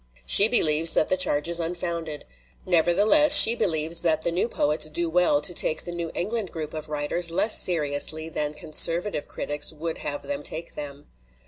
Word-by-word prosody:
She 200 - +6
believes 160 -8 +3
that - - -2
the - - 0
charge 150 -4 -2
is 170 0 0
unfounded. 165 -2 -7 0.4
Nevertheless, 195 - +4
she 225 - +9
believes 165 -6 -1
that 160 -2 -1
the 170 - -3
new 175 +6 -3
poets 155 -7 -3
do 165 +1 -3
well 175 -4 0
to 180 - +2
take 155 -2 -2
the 175 - -8
New 170 -1 -7
England 210 +1 -5
group 155 -2 -9
of 155 -1 -8
writers 150 +3 -2
less 210 +6 +2
seriously 155 -1 0
than 150 -2 -6
conservative 165 +3 0
critics 145 0 -2
would 160 +1 -8
have 145 -1 -7
them 285 0 -7
take 165 +2 -7
them. 145 -1 -11
165 Hz, 180 wpm, -21 LUFS, 150-175 Hz, 0.4 s, she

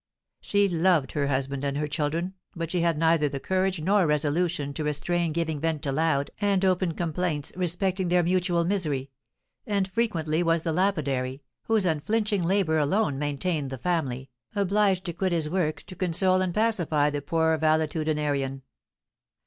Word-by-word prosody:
She 205 0 +2
loved 170 -5 +2
her 145 -2 0
husband 135 0 -1
and 140 0 -1
her 150 - 0
children, 160 +4 -2 0.2
but 165 -1 -4
she 180 - 0
had 170 -2 +1
neither 160 -2 +3
the 140 0 -4
courage 190 +3 0
nor 190 +1 +3
resolution 150 0 0
to 155 - -3
restrain 165 +3 -1
giving 160 -2 -2
vent 160 -1 -1
to 140 - -1
loud 145 -1 +1
and 200 -2 +2
open 185 -2 +1
complaints 165 -3 -2
respecting 185 +1 0
their 175 0 +3
mutual 175 -1 +1
misery; 150 -8 -1 0.6
and 200 -3 +1
frequently 175 -7 0
was 165 -1 +1
the 165 - -1
lapidary, 140 -8 -1 0.2
whose 220 -3 +2
unflinching 205 +5 0
labour 170 -3 +2
alone 145 -1 +1
maintained 145 0 -2
the 135 - -5
family, 135 -4 -2 0.2
obliged 200 -1 +2
to 170 - -3
quit 185 +1 -1
his 160 -3 0
work 155 -2 -1
to 185 - -11
console 185 +1 +2
and 185 -2 -1
pacify 170 -10 +2
the 145 0 -3
poor 160 +2 +1
valetudinarian. 150 -3 0
165 Hz, 160 wpm, -26 LUFS, 150-185 Hz, 0.6 s, neither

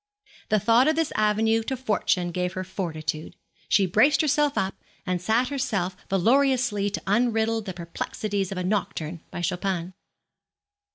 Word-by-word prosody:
The 215 - +4
thought 230 +6 +4
of 310 - +3
this 325 -1 0
avenue 220 +1 +2
to 260 +4 -3
fortune 205 -7 0
gave 180 +1 -2
her 185 - -3
fortitude. 160 -4 -4 0.3
She 200 - +4
braced 220 - +4
herself 295 -1 +1
up, 190 0 0 0.3
and 180 -2 -1
set 225 +6 +1
herself 215 -10 -1
valourously 235 0 +2
to 205 - -4
unriddle 225 +1 +1
the 190 - -5
perplexities 195 +3 -3
of 195 - -4
a 180 - -2
nocturne 180 -4 -2
by - - -6
Chopin. 180 0 -2
205 Hz, 150 wpm, -25 LUFS, 180-235 Hz, 0.3 s, The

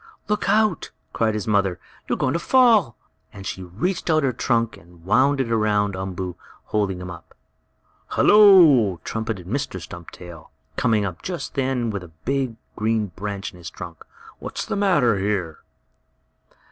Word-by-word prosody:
"Look 210 0 -1
out!" 215 -5 +2 0.2
cried 110 -1 +1
his 105 +2 -4
mother. 100 -4 +1 0.3
"You - - +1
are - - 0
going 130 - 0
to 170 - 0
fall!" 225 - +4 0.3
and 95 - -11
she 95 - -5
reached 120 - -3
out 155 -1 +3
her 130 -2 +1
trunk 115 -2 0
and 85 -3 -19
wound 135 +7 +3
it 125 -3 -1
around 105 -3 +1
Umboo, 95 -1 -5 0.3
holding 100 -4 -1
him 90 0 -7
up. 85 - -13 0.7
"Hello!" 165 - +6
trumpeted 110 -5 -4
Mr. 130 +1 -3
Stumptail, 85 -1 -11 0.3
coming 110 -3 +1
up 90 -4 -5
just 180 -2 -5
then 130 -4 -1
with 100 -2 -4
a - - -10 0.2
big 135 -3 -1 0.2
green 110 -2 0
branch 100 -1 -5
in 90 - -16
his 85 0 -7
trunk. 85 -3 -10 0.4
"What's - - -5
the - - -3
matter 145 - +3
here?" 95 -5 -2
110 Hz, 160 wpm, -23 LUFS, 95-135 Hz, 0.7 s, Hello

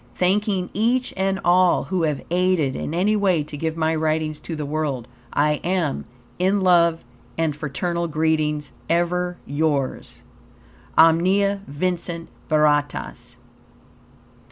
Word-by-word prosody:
Thanking 190 0 0
each 240 +5 +1
and 190 0 0
all 180 0 +4
who 185 -2 -2
have 150 -4 -1
aided 175 -6 +1
in 155 - -4
any 200 +5 +2
way 190 -7 +2
to 150 - -8
give 160 +2 -3
my 160 0 +1
writings 155 -1 -1
to 165 +2 -6
the 150 -1 -4
world, 140 -5 -2 0.2
I 150 0 +1
am, 175 -5 -1 0.3
in 190 +2 +2
love 170 -4 +4 0.3
and 160 -3 0
fraternal 170 +4 -2
greetings, 155 -2 0 0.2
ever 175 +1 0
yours. 145 -2 -2 0.8
Omnia 190 +5 +4
Vincit 170 +2 -3 0.2
Veritas. 150 -2 0
165 Hz, 120 wpm, -22 LUFS, 150-185 Hz, 0.8 s, all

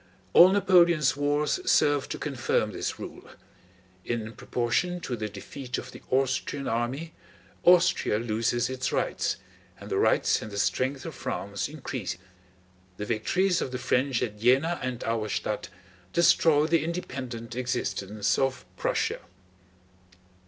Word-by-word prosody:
All 180 - +9
Napoleon's 175 -7 +4
wars 145 - +1
serve 145 - +3
to - - -3
confirm - - -1
this - - -3
rule. - - -9 0.7
In 115 -1 -3
proportion 125 +13 -1
to 125 - -3
the 110 -2 -4
defeat 125 +6 -6
of - - -7
the - - -12
Austrian 135 +1 0
army 130 +8 -2 0.5
Austria 180 -10 +4
loses 115 +1 0
its 130 0 -2
rights, - - 0 0.4
and - - -10
the - - +1
rights - - +3
and 110 - -6
the 100 - -7
strength 130 +8 0
of 165 - -5
France 100 -4 -4
increase. 130 - -5 0.8
The 105 - -4
victories 180 - +1
of 130 - -3
the 130 - -3
French 130 0 +1
at 105 -3 -4
Jena 135 +9 +3
and 125 -2 -3
Auerstädt 110 -2 -2 0.5
destroy 160 -3 +4
the 160 -1 +2
independent 130 -8 -5
existence 105 -5 -1
of 135 -1 0
Prussia. - - 0
130 Hz, 130 wpm, -27 LUFS, 115-155 Hz, 0.8 s, All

